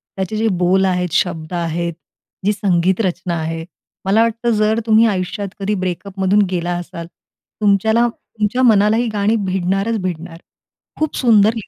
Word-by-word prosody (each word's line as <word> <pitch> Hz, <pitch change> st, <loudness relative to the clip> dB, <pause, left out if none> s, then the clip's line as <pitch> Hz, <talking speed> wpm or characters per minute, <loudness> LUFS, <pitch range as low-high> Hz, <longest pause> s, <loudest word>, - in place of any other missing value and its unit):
त्याचे 190 Hz, +2 st, -3 dB
जे 225 Hz, +1 st, +1 dB
बोल 190 Hz, +2 st, +3 dB
आहेत, 180 Hz, -2 st, 0 dB
शब्द 170 Hz, -2 st, -1 dB
आहेत, 170 Hz, 0 st, -2 dB, 0.5 s
जी 210 Hz, -, +3 dB
संगीत 190 Hz, -1 st, +1 dB
रचना 175 Hz, -1 st, -2 dB
आहे, 165 Hz, 0 st, -4 dB, 0.4 s
मला 205 Hz, +4 st, +3 dB
वाटतं 230 Hz, +1 st, 0 dB
जर 215 Hz, +2 st, +2 dB
तुम्ही 220 Hz, +1 st, +5 dB
आयुष्यात 195 Hz, 0 st, -2 dB
कधी 200 Hz, +2 st, -1 dB
ब्रेकअपमधून 190 Hz, +2 st, 0 dB
गेला 175 Hz, -1 st, -1 dB
असाल, 170 Hz, -1 st, -7 dB, 0.5 s
तुमच्याला 220 Hz, +4 st, +3 dB
तुमच्या 225 Hz, +2 st, -3 dB
मनाला 215 Hz, -2 st, +4 dB
ही 240 Hz, -, 0 dB
गाणी 210 Hz, +2 st, +1 dB
भिडणारच 190 Hz, +4 st, 0 dB
भिडणार 170 Hz, -1 st, -5 dB, 0.6 s
खूप 310 Hz, -1 st, -1 dB
सुंदर 220 Hz, -3 st, +4 dB
लि 220 Hz, -, -6 dB
195 Hz, 150 wpm, -18 LUFS, 175-220 Hz, 0.6 s, तुम्ही